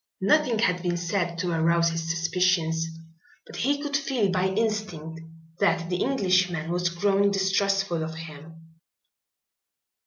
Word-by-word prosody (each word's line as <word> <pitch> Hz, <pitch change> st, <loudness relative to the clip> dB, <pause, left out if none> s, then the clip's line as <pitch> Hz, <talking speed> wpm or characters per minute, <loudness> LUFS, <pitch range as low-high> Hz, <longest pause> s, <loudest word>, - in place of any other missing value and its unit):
Nothing 245 Hz, +4 st, +3 dB
had 180 Hz, -5 st, +1 dB
been 175 Hz, -1 st, -1 dB
said 175 Hz, 0 st, -2 dB
to 180 Hz, 0 st, -2 dB
arouse 170 Hz, +1 st, +2 dB
his 165 Hz, 0 st, -4 dB
suspicions 165 Hz, -1 st, +1 dB, 0.6 s
but -, -, -10 dB
he 285 Hz, +3 st, +1 dB
could 290 Hz, -1 st, -2 dB
feel 260 Hz, -8 st, 0 dB
by 185 Hz, 0 st, +1 dB
instinct 190 Hz, -6 st, -3 dB, 0.4 s
that 175 Hz, -4 st, +1 dB
the 180 Hz, -, 0 dB
Englishman 185 Hz, -, +1 dB
was 175 Hz, 0 st, 0 dB
growing 200 Hz, +3 st, +2 dB
distrustful 195 Hz, -2 st, +1 dB
of 160 Hz, 0 st, -5 dB
him. 160 Hz, +1 st, -12 dB
180 Hz, 130 wpm, -26 LUFS, 165-200 Hz, 0.6 s, Nothing